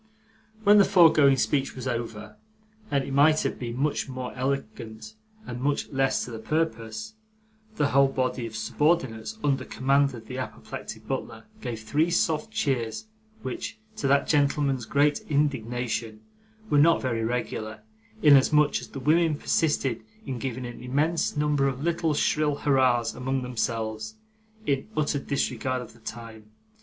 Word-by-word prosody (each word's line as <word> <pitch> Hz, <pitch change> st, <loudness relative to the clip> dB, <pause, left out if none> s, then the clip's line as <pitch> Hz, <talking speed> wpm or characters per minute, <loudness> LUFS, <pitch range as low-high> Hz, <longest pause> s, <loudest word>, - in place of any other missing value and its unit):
When 205 Hz, 0 st, +7 dB
the -, -, +8 dB
foregoing 160 Hz, -8 st, +6 dB
speech 135 Hz, +1 st, 0 dB
was 130 Hz, 0 st, -5 dB
over 115 Hz, -3 st, -4 dB, 0.5 s
and 140 Hz, -1 st, +1 dB
it 135 Hz, -, -5 dB
might 155 Hz, +3 st, +5 dB
have -, -, -2 dB
been 120 Hz, -1 st, -4 dB
much 140 Hz, 0 st, -1 dB
more 130 Hz, -1 st, -5 dB
elegant 130 Hz, -, -4 dB, 0.3 s
and 125 Hz, 0 st, -6 dB
much 145 Hz, +2 st, 0 dB
less 135 Hz, -1 st, +1 dB
to 125 Hz, -, -9 dB
the 115 Hz, -, -6 dB
purpose 155 Hz, -, -2 dB, 0.6 s
the 145 Hz, -8 st, +1 dB
whole 140 Hz, 0 st, +5 dB
body 130 Hz, -2 st, -1 dB
of 110 Hz, -, -10 dB
subordinates 130 Hz, -, 0 dB
under 140 Hz, -2 st, +1 dB
command 140 Hz, 0 st, +1 dB
of 110 Hz, -1 st, -10 dB
the 130 Hz, +2 st, -6 dB
apoplectic 130 Hz, -, -7 dB
butler -, -, -4 dB, 0.2 s
gave 115 Hz, -3 st, -5 dB
three 150 Hz, +10 st, +1 dB
soft 165 Hz, +1 st, +1 dB
cheers; 135 Hz, -, -1 dB, 0.4 s
which, 130 Hz, -, -5 dB, 0.2 s
to 140 Hz, -, -1 dB
that 140 Hz, +1 st, +3 dB
gentleman's 140 Hz, -4 st, +1 dB
great 145 Hz, +4 st, +2 dB
indignation, 120 Hz, -6 st, -1 dB, 0.5 s
were 145 Hz, -, +3 dB
not 165 Hz, +3 st, +5 dB
very 115 Hz, -3 st, -1 dB
regular, 110 Hz, -2 st, -3 dB, 0.4 s
inasmuch 150 Hz, 0 st, +5 dB
as -, -, -9 dB
the 135 Hz, -, -8 dB
women 155 Hz, +3 st, +3 dB
persisted 135 Hz, -9 st, 0 dB, 0.2 s
in 130 Hz, -3 st, -4 dB
giving 130 Hz, -1 st, -4 dB
an 120 Hz, 0 st, -8 dB
immense 150 Hz, +6 st, 0 dB
number 145 Hz, -2 st, +2 dB
of 135 Hz, +1 st, -3 dB
little 165 Hz, -2 st, 0 dB
shrill 150 Hz, 0 st, +1 dB
hurrahs 130 Hz, -5 st, +2 dB
among 130 Hz, 0 st, -2 dB
themselves, 110 Hz, -3 st, -3 dB, 0.5 s
in 135 Hz, +3 st, 0 dB
utter 150 Hz, -1 st, +1 dB
disregard 130 Hz, -2 st, -1 dB
of 125 Hz, -, -9 dB
the 115 Hz, -, -19 dB
time. 110 Hz, -1 st, -9 dB
135 Hz, 150 wpm, -26 LUFS, 120-150 Hz, 0.6 s, the